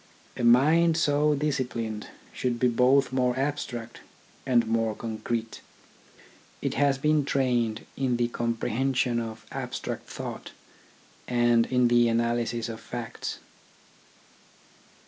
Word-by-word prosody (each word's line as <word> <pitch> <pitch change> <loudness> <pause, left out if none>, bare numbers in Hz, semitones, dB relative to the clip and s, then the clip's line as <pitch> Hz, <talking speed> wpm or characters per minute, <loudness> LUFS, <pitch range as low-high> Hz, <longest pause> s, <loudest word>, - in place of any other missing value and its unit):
A - - -4
mind 155 +8 +5
so 150 -1 +2
disciplined 125 -7 -2 0.3
should 120 -2 -2
be 125 - +4
both 125 +3 +3
more 125 -1 +1
abstract 130 -4 -3 0.5
and 120 -3 +4
more 115 -1 0
concrete. 115 0 -4 1.0
It - - -2
has 140 -1 +2
been 150 +1 +2
trained 120 -5 0
in 130 -3 0
the 120 0 +1
comprehension 120 +2 0
of 115 -1 -6
abstract - - -5
thought - - -7 0.7
and 120 -1 +3
in 125 -1 +3
the 120 0 +4
analysis 115 0 0
of 115 -1 -6
facts. 120 0 -6
120 Hz, 110 wpm, -27 LUFS, 115-135 Hz, 1.0 s, mind